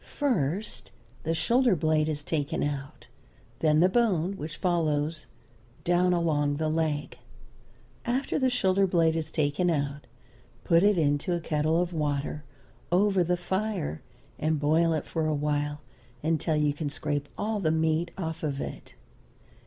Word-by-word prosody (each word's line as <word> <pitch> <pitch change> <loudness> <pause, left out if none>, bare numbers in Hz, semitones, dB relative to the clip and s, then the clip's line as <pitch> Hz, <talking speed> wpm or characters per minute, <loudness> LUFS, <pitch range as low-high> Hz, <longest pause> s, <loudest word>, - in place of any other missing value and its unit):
First, 210 - -2 0.3
the 165 +1 -1
shoulder 240 +3 +3
blade 155 -1 +1
is 150 -1 -3
taken 155 +1 -1
out, 145 -1 -4 0.5
then 155 -1 +3
the 180 - +6
bone 195 -4 +1
which 155 -3 -6
follows 155 -3 0 0.6
down 175 +1 +3
along 150 -4 +1
the 155 0 0
leg. 155 -2 -1 0.8
After 255 +5 -1
the 260 -1 +3
shoulder 195 -5 +2
blade 165 -3 +3
is 160 -1 -2
taken 155 +3 +1
out 145 -2 -2 0.6
put 165 0 +4
it 205 0 +4
into 145 +2 +1
a - - -1
kettle 155 0 +1
of 175 0 -1
water, 150 -1 -2 0.5
over 190 0 +3
the 175 +1 0
fire, 190 - -2 0.4
and 155 0 +1
boil 160 +3 +3
it 155 - -2
for 160 -2 -1
awhile 145 0 -1 0.4
until 160 0 +1
you 150 -1 +2
can 145 0 -3
scrape 145 0 -3
all 215 0 -1
the 165 -5 +1
meat 160 +1 +1
off 160 -3 -4
of 145 -3 -2
it. - - -7
160 Hz, 145 wpm, -28 LUFS, 150-180 Hz, 0.8 s, the